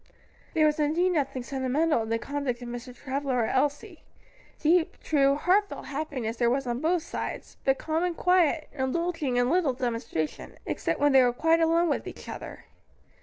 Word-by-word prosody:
There 310 -1 +4
was 305 0 +2
indeed 325 +5 +2
nothing 275 -6 -1
sentimental 270 +3 0
in 220 - -5
the 230 - +1
conduct 260 -1 -3
of - - -7
Mr. 245 +1 -7
Travilla 270 0 -2
or 240 -2 +2
Elsie: 295 - -1 0.6
deep, 330 +2 +2
true, 275 -2 +3
heartfelt 390 +7 +1
happiness 270 -6 -4
there 235 -1 +3
was 270 +2 0
on 240 +1 -2
both 330 +1 +1
sides, - - -6
but 270 0 +3
calm 320 +2 -1
and 355 -2 -1
quiet, 345 -4 +3
indulging 285 -1 -1
in 245 +2 +2
little 335 -6 +2
demonstration, 230 - -3
except - - -2
when 290 0 +4
they 265 -1 +7
were 245 -1 +4
quite 325 +6 +2
alone 335 +1 +3
with 295 - -1
each - - -9
other. - - -8
285 Hz, 175 wpm, -27 LUFS, 250-330 Hz, 0.6 s, they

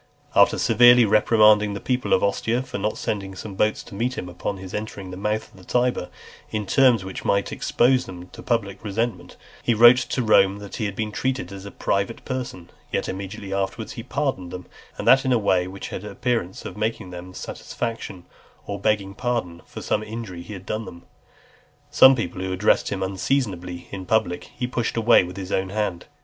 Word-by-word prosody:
After - - +5
severely 120 +1 +6
reprimanding 105 -1 +4
the - - -4
people 125 +2 -1
of - - +4
Ostia 115 +5 0
for 100 - -6
not 105 +2 -1
sending 95 -2 -3
some 100 +2 -7
boats 105 +3 0
to - - -13
meet 120 +5 -2
him 90 - -5
upon 90 +3 -4
his 95 -1 -9
entering 105 -3 -5
the - - -6
mouth 105 +3 -2
of - - -19
the - - -15
Tiber, 125 -4 0 0.4
in 105 -1 -3
terms 120 -2 +4
which 95 - -6
might 100 0 +1
expose 125 +1 +2
them 90 -1 -9
to - - -15
the - - -8
public 105 -5 -1
resentment, 115 +3 -3 0.2
he 120 - +1
wrote 120 +3 +8
to 125 0 -1
Rome 100 -3 +4
that 100 -1 -8
he 110 - -1
had 100 -1 -3
been 110 0 -2
treated 130 -5 -2
as 100 0 -8
a - - -6
private 100 +2 -2
person; 120 -10 -5 0.2
yet - - -1
immediately 95 +1 -5
afterwards 100 +3 -2
he - - -6
pardoned 130 -9 -2
them, 90 0 -7 0.3
and - - -5
that 135 0 +7
in 130 - 0
a 125 - +4
way 95 -4 +2
which 95 +1 -7
had - - -5
the 105 - -7
appearance 105 -3 -2
of - - -6
making 110 -3 -3
them 90 0 -7
(327) - - -16 0.2
satisfaction, 115 -6 -5 0.4
or 100 0 -5
begging 100 -1 0
pardon 110 -8 -2
for - - -8
some 105 - 0
injury 110 -5 -7
he 95 +5 -9
had 95 -1 -9
done 110 +2 -3
them. 85 0 -11 0.9
Some 130 0 +8
people 90 -6 -4
who 95 0 -3
addressed 95 +3 +2
him 95 -1 -2
unseasonably 95 -3 -2
in 95 -2 -7
public, 110 -6 +1
he 125 - -5
pushed 120 -2 -2
away 115 -2 +6
with 90 +1 -8
his 95 -1 -6
own 95 0 0
hand. 95 -4 -2
105 Hz, 210 wpm, -23 LUFS, 95-115 Hz, 0.9 s, wrote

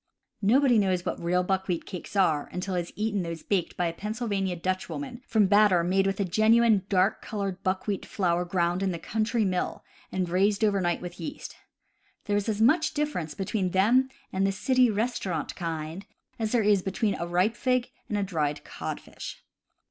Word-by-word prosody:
— - - -53 0.2
Nobody 265 -5 +4
knows 185 -3 +1
what - - -3
real 180 +2 +1
buck 190 +1 -1
wheat 175 -3 -2
cakes 185 +1 -8
are 160 -7 +2
until 185 +1 -3
he 180 - +1
has 170 - -9
eaten 210 -2 -1
those 165 -2 -5
baked 190 -5 -1
by 180 - +1
a 165 - -1
Pennsylvania 205 -2 -2
Dutchwoman 210 +9 -4
from 220 -2 +3
batter 200 -3 +5
made 190 +2 +2
with 195 0 -1
genuine 220 0 +5
dark 190 +1 +2
colored 195 -4 -4
buckwheat 190 +1 -1
flour 175 -3 0
ground 175 0 0
in 195 -1 +1
a - - -4
country 220 +4 0
mill, 185 -2 -2 0.3
and 185 -1 -1
raised 200 +4 +2
over 200 -2 +3
night 175 -1 0
with 175 0 -8
yeast. 295 0 -6 0.7
There 205 - 0
is 205 +2 0
as 210 -1 -1
much 310 +8 +3
difference 295 - -2
between 195 -1 -1
them 240 +8 +4 0.2
and 195 +1 +2
the - - +1
city 255 +5 +3
res 225 +3 -1
taurant 170 -5 -3
kind 165 +2 -5 0.3
as 220 -1 -1
there 240 -3 +3
is 205 -2 +4
between 195 +3 0
a 170 - -4
ripe 180 +6 +1
fig 255 -2 0 0.2
and 210 - 0
a 205 - +1
dried 150 -6 -1
codfish. - - -7
195 Hz, 190 wpm, -27 LUFS, 180-215 Hz, 0.7 s, batter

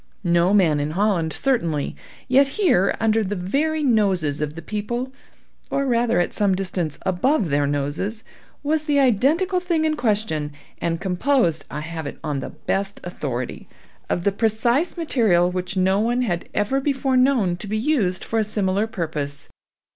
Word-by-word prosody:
No 175 0 +3
man 175 -8 +4
in 145 +1 -1
Holland 190 -6 +1
certainly; 170 - 0 0.3
yet 270 +2 +5
here, 265 - +3
under 225 0 +2
the 205 +1 -2
very 295 - 0
noses 190 - +1
of 150 0 -3
the 165 - -7
people, 240 +7 -3 0.6
or 275 - 0
rather 235 -6 +2
at 175 - 0
some 200 -3 +2
distance 180 -6 -2
above 195 - +1
their 145 0 +2
noses 145 +10 -2 0.4
was 305 +1 0
the 290 -2 +2
identical 285 - +2
thing 340 -3 0
in 310 -1 +1
question, 205 - -1 0.3
and 165 -1 -1
composed, 190 - +1
I 150 - -5
have 160 -1 -5
it - - -7
on 145 -2 -2
the - - -5
best 195 +1 -3
authority, 130 -8 -5 0.4
of 170 - -1
the 200 - +3
precise 235 - +1
material 215 - +2
which 185 +1 -4
no 190 +2 +3
one 240 +3 +1
had 175 -7 -2
ever 240 +7 0
before 270 -1 0
known 255 -9 +3
to 205 - -8
be 215 +2 -1
used 215 -8 0
for 225 - -1
a - - +3
similar 205 0 0
purpose. 155 -8 -4
205 Hz, 165 wpm, -22 LUFS, 170-255 Hz, 0.6 s, yet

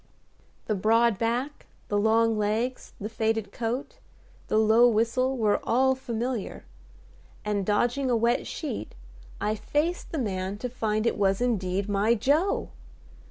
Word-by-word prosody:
The 215 - 0
broad 225 +2 +3
back, 245 +6 -2 0.2
the 205 - 0
long 225 +1 +3
legs, 220 +5 -2
the 205 - -4
faded 220 -2 -1
coat, 240 +4 -4 0.5
the - - +1
low 220 +2 +6
whistle 240 +4 +1
were 215 -3 +2
all 265 +3 +3
familiar; 240 -3 -4 0.8
and, 205 -1 0
dodging 240 +6 +1
a 240 - +3
wet 235 +2 +1
sheet, 310 - -5 0.4
I 210 +1 0
faced 295 +11 -2
the 325 - -3
man 195 -5 -2
to 250 +4 -4
find 215 -2 -1
it 235 - 0
was 195 -1 +2
indeed 200 -5 0
my 205 +3 +2
Joe! 295 - +1
225 Hz, 140 wpm, -27 LUFS, 210-250 Hz, 0.8 s, low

